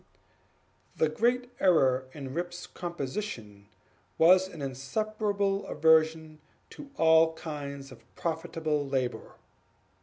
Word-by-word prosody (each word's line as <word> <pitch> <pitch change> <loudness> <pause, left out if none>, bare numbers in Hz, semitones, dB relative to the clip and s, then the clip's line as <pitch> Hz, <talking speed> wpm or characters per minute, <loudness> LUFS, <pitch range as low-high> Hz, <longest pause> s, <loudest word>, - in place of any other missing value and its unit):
The 160 - +2
great 245 +8 0
error 130 -8 +3
in 135 -3 -7
Rip's 175 +2 -4
composition 140 - -6 0.5
was 185 +3 +6
an 170 -4 -11
insuperable 200 - -2
aversion 160 0 +2 0.3
to 285 - -11
all 160 0 +5
kinds 140 -4 -7
of 130 - -14
profitable 160 -2 -2
labor. 135 -3 -3
160 Hz, 95 wpm, -29 LUFS, 140-185 Hz, 0.5 s, was